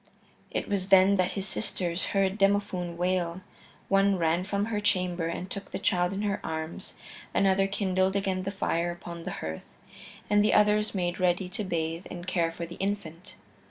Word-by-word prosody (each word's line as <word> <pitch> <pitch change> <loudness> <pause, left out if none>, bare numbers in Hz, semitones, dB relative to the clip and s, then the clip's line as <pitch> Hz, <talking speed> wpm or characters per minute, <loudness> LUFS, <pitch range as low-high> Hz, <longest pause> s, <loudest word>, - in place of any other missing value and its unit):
It - - -3
was 195 -2 -1
then 195 +1 +6
that 185 0 +1
his 195 0 -2
sisters 180 -4 -1
heard 195 +1 +1
Demophoon 195 -3 +1
wail; 180 0 0 0.5
one 195 0 +3
ran 170 +1 +1
from 200 +1 -1
her 215 -2 -1
chamber 180 -4 +1
and 170 +2 -4
took 200 +1 -7
the - - -4
child 180 -2 +1
in 200 +1 -3
her 200 -2 0
arms; 160 +1 -5 0.4
another 195 0 +3
kindled 190 -1 +1
again 190 -2 0
the 190 - -3
fire 175 -3 -1
upon 170 -1 -7
the - - -3
hearth, 80 0 -5 0.6
and 205 0 +4
the 210 - +3
others 210 0 +3
made 175 -1 -1
ready 180 +1 +2
to 200 +3 -4
bathe 165 -1 -2
and 175 -1 -7
care 170 -3 +1
for 170 +1 -5
the 170 - -10
infant. 195 -2 -4
185 Hz, 180 wpm, -28 LUFS, 175-200 Hz, 0.6 s, then